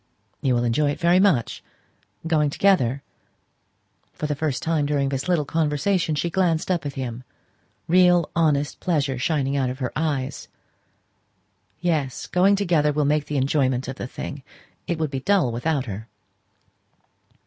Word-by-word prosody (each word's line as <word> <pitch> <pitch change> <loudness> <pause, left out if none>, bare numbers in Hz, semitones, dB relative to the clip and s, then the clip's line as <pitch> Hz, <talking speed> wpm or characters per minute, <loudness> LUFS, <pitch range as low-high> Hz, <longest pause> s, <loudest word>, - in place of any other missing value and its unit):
"You 130 -2 +2
will 120 - +1
enjoy 125 +5 +1
it 145 - -3
very 175 +2 +4
much 185 - +1 0.6
going 155 -3 +2
together?" 140 -7 +2 1.1
For - - -5
the 150 - 0
first 145 -2 -2
time 160 -3 0
during 140 -2 0
this 135 +2 -3
little 165 -5 +2
conversation 160 +3 0
she 170 +4 -1
glanced 175 -1 +1
up 165 -5 -1
at 140 - -5
him 125 -2 -5 0.6
real 175 -1 +4
honest 150 -3 +1
pleasure 140 -7 0
shining 140 0 0
out 135 -2 +1
of 130 - -5
her 130 -2 -3
eyes. 145 -3 -2 1.3
"Yes; 155 -7 -1
going 190 +3 +3
together 170 -7 +2
will 150 0 0
make 150 +1 +1
the 150 - -2
enjoyment 130 -2 +1
of 130 +1 -6
the - - -5
thing. 140 +2 -7 0.5
It 170 -3 -1
would 155 -3 -2
be 135 - -2
dull 185 -4 +2
without 135 +4 -1
her." 110 0 -7
150 Hz, 155 wpm, -23 LUFS, 135-165 Hz, 1.3 s, very